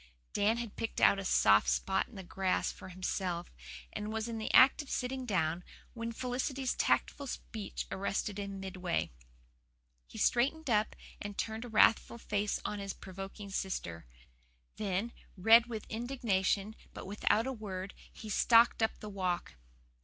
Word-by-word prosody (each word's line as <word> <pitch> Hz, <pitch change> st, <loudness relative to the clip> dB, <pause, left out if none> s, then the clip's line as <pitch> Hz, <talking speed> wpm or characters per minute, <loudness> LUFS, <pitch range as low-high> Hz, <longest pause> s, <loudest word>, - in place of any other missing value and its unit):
Dan 215 Hz, +3 st, +2 dB
had 235 Hz, -3 st, -5 dB
picked 225 Hz, -, -3 dB
out 200 Hz, -, +5 dB
a -, -, -4 dB
soft 105 Hz, -, +5 dB
spot 190 Hz, 0 st, +1 dB
in 245 Hz, -, -16 dB
the 190 Hz, -, -7 dB
grass 190 Hz, +1 st, 0 dB
for -, -, -11 dB
himself, 180 Hz, -1 st, -3 dB, 0.4 s
and 210 Hz, +1 st, -4 dB
was 220 Hz, +1 st, -2 dB
in 230 Hz, -1 st, -4 dB
the 220 Hz, -, -3 dB
act 265 Hz, +4 st, +7 dB
of 290 Hz, -, -11 dB
sitting 255 Hz, 0 st, -2 dB
down, 170 Hz, -4 st, 0 dB, 0.3 s
when 230 Hz, -1 st, -4 dB
Felicity's 255 Hz, +2 st, -2 dB
tactful 280 Hz, -1 st, +1 dB
speech 220 Hz, -4 st, -5 dB
arrested 200 Hz, +1 st, -2 dB
him 200 Hz, -1 st, -5 dB
midway. 185 Hz, -, -2 dB, 1.0 s
He -, -, -11 dB
straightened 280 Hz, +4 st, +2 dB
up 210 Hz, 0 st, +2 dB, 0.3 s
and 205 Hz, -1 st, -6 dB
turned 220 Hz, +2 st, -3 dB
a -, -, -8 dB
wrathful 225 Hz, +1 st, +4 dB
face 210 Hz, -2 st, -1 dB
on 210 Hz, -, -2 dB
his 195 Hz, -1 st, -4 dB
provoking 195 Hz, +2 st, -8 dB
sister. 85 Hz, -, -4 dB, 0.7 s
Then, 205 Hz, +2 st, -1 dB, 0.3 s
red 225 Hz, +5 st, +7 dB
with 220 Hz, -3 st, -5 dB
indignation, 220 Hz, -4 st, 0 dB, 0.2 s
but -, -, -7 dB
without 210 Hz, +3 st, +1 dB
a 265 Hz, -, -2 dB
word, 195 Hz, -4 st, -6 dB, 0.2 s
he 220 Hz, -, -10 dB
stalked 230 Hz, +3 st, +5 dB
up 220 Hz, -, +1 dB
the 215 Hz, -, -6 dB
walk. 185 Hz, -, -2 dB
210 Hz, 155 wpm, -33 LUFS, 190-230 Hz, 1.0 s, act